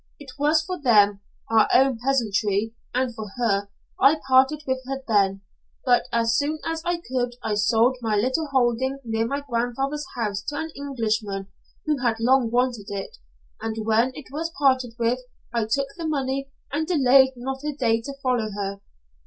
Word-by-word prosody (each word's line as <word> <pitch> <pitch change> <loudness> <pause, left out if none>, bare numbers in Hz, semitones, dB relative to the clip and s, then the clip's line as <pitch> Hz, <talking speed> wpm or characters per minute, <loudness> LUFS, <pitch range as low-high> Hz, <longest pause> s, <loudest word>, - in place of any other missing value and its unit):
It 280 -3 -10
was 305 +2 +3
for 360 0 -5
them, 205 -6 +4 0.3
our 220 -1 +5
own 265 -2 +4
peasantry, 220 -4 +1 0.2
and 255 -1 0
for 220 -2 -6
her, 200 -4 +1 0.3
I 285 +4 +5
parted 265 +3 +4
with 260 0 0
her 270 0 -4
then, 195 -3 +2 0.4
but 245 -2 +4
as 230 -1 +2
soon 295 +2 0
as 325 0 -2
I 345 0 -2
could 245 -2 -1
I 220 - -1
sold 225 +4 +3
my 220 -2 0
little 260 +9 +1
holding 260 0 +1
near 225 -1 -1
my 280 +3 -2
grandfather's 270 +4 -2
house 210 -4 -2
to 290 - -3
an 320 +1 -4
Englishman 220 -8 -2 0.4
who 300 -2 0
had 235 -3 0
long 250 0 +3
wanted 240 -3 0
it, 200 -1 -6 0.4
and 220 -1 -3
when 225 +3 +3
it 295 - -9
was 325 +4 -3
parted 260 -4 +2
with, 235 +2 +1 0.3
I 230 -2 +1
took 275 +4 0
the 335 -2 -4
money 275 -2 -2 0.2
and 310 +3 -1
delayed 265 -5 +5
not 265 +3 -5
a 300 - -1
day 230 -4 +1
to 275 +4 -7
follow 245 -4 +1
her. 200 0 -4
250 Hz, 175 wpm, -24 LUFS, 225-275 Hz, 0.4 s, our